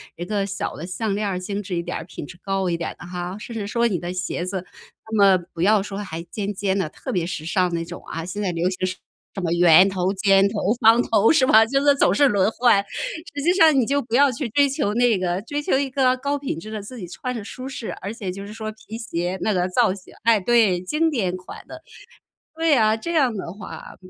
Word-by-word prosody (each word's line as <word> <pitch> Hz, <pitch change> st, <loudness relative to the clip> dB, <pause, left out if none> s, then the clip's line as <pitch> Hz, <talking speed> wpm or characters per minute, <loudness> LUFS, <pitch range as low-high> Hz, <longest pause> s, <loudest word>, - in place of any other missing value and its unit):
一 175 Hz, -, -6 dB
个 200 Hz, +1 st, -1 dB
小 195 Hz, 0 st, -4 dB
的 155 Hz, -, -7 dB
项 195 Hz, +3 st, -2 dB
链 210 Hz, 0 st, -1 dB
儿， 185 Hz, -2 st, -2 dB
精 200 Hz, +2 st, -4 dB
致 185 Hz, -2 st, -4 dB
一 170 Hz, -, -1 dB
点 -, -, -4 dB
儿、 -, -, -6 dB
品 -, -, -8 dB
质 175 Hz, -, -12 dB
高 195 Hz, -1 st, -1 dB
一 170 Hz, -, 0 dB
点 165 Hz, -, -4 dB
儿 -, -, -12 dB
的 175 Hz, -, -10 dB
哈。 180 Hz, +1 st, -5 dB
甚 230 Hz, +2 st, -8 dB
至 215 Hz, -3 st, -3 dB
说 235 Hz, +3 st, +1 dB
你 200 Hz, -6 st, -1 dB
的 175 Hz, +2 st, -5 dB
鞋 180 Hz, -1 st, -3 dB
子， 185 Hz, -1 st, -4 dB, 0.4 s
那 220 Hz, -, -3 dB
么 200 Hz, -3 st, +6 dB, 0.2 s
不 165 Hz, -, -6 dB
要 205 Hz, +3 st, +4 dB
说 195 Hz, 0 st, -6 dB
还 165 Hz, -5 st, -5 dB
尖 205 Hz, +3 st, -4 dB
尖 195 Hz, 0 st, -1 dB
的、 190 Hz, -6 st, -1 dB
特 -, -, -7 dB
别 175 Hz, -3 st, 0 dB
时 170 Hz, -3 st, -5 dB
尚 180 Hz, 0 st, +1 dB
那 165 Hz, 0 st, -2 dB
种 175 Hz, +1 st, -9 dB
啊， 165 Hz, 0 st, -4 dB
现 200 Hz, +4 st, -5 dB
在 195 Hz, -3 st, 0 dB
流 170 Hz, +1 st, 0 dB
行 185 Hz, 0 st, -3 dB, 0.5 s
什 195 Hz, -, -4 dB
么 170 Hz, -2 st, 0 dB
圆 175 Hz, +1 st, +7 dB
头、 185 Hz, -1 st, 0 dB
尖 195 Hz, 0 st, +4 dB
头、 205 Hz, 0 st, 0 dB
方 225 Hz, +1 st, +6 dB
头， 225 Hz, -2 st, +3 dB
是 290 Hz, -5 st, +4 dB
吧？ 220 Hz, -2 st, +7 dB
就 275 Hz, +5 st, +1 dB
是 285 Hz, -1 st, +6 dB
总 -, -, +3 dB
是 285 Hz, -, +4 dB
轮 200 Hz, -3 st, +2 dB
换， 235 Hz, -4 st, +3 dB, 0.5 s
实 285 Hz, -, -4 dB
际 345 Hz, +5 st, +3 dB
上 325 Hz, -4 st, +6 dB
你 245 Hz, -, +2 dB
就 280 Hz, +4 st, +1 dB
不 235 Hz, -2 st, -3 dB
要 280 Hz, +2 st, +6 dB
去 250 Hz, 0 st, -4 dB
追 285 Hz, +5 st, +3 dB
求 270 Hz, -7 st, -1 dB
那 240 Hz, -3 st, +3 dB
个， 180 Hz, 0 st, -1 dB
追 290 Hz, +5 st, -3 dB
求 270 Hz, -, +1 dB
一 280 Hz, -1 st, -1 dB
个 255 Hz, -1 st, +2 dB
高 280 Hz, +2 st, -1 dB
品 270 Hz, -, -4 dB
质 215 Hz, -, -9 dB
的， 215 Hz, -1 st, -5 dB
自 230 Hz, +5 st, -10 dB
己 185 Hz, -6 st, -7 dB
穿 250 Hz, +8 st, -5 dB
着 230 Hz, -, -5 dB
舒 255 Hz, +5 st, -8 dB
适， 250 Hz, -4 st, -5 dB
而 200 Hz, +3 st, -5 dB
且 205 Hz, -4 st, -6 dB
就 195 Hz, +2 st, -6 dB
是 205 Hz, -, -9 dB
说 220 Hz, 0 st, -5 dB
皮 220 Hz, +1 st, -10 dB
鞋 180 Hz, -5 st, -3 dB
那 215 Hz, -, +1 dB
个 180 Hz, 0 st, 0 dB
造 220 Hz, +1 st, +2 dB
型 190 Hz, -2 st, -13 dB
哎， 225 Hz, -2 st, +4 dB
对， 210 Hz, -4 st, +3 dB
经 305 Hz, -, +1 dB
典 190 Hz, -, -1 dB
款 185 Hz, -, -11 dB
的， -, -, -11 dB, 0.7 s
对 325 Hz, -2 st, +3 dB
啊， 220 Hz, -3 st, +3 dB
这 335 Hz, +10 st, -5 dB
样 270 Hz, -7 st, +3 dB
的 185 Hz, -4 st, -5 dB
话 205 Hz, -1 st, -10 dB
205 Hz, 280 characters per minute, -22 LUFS, 185-235 Hz, 0.7 s, 圆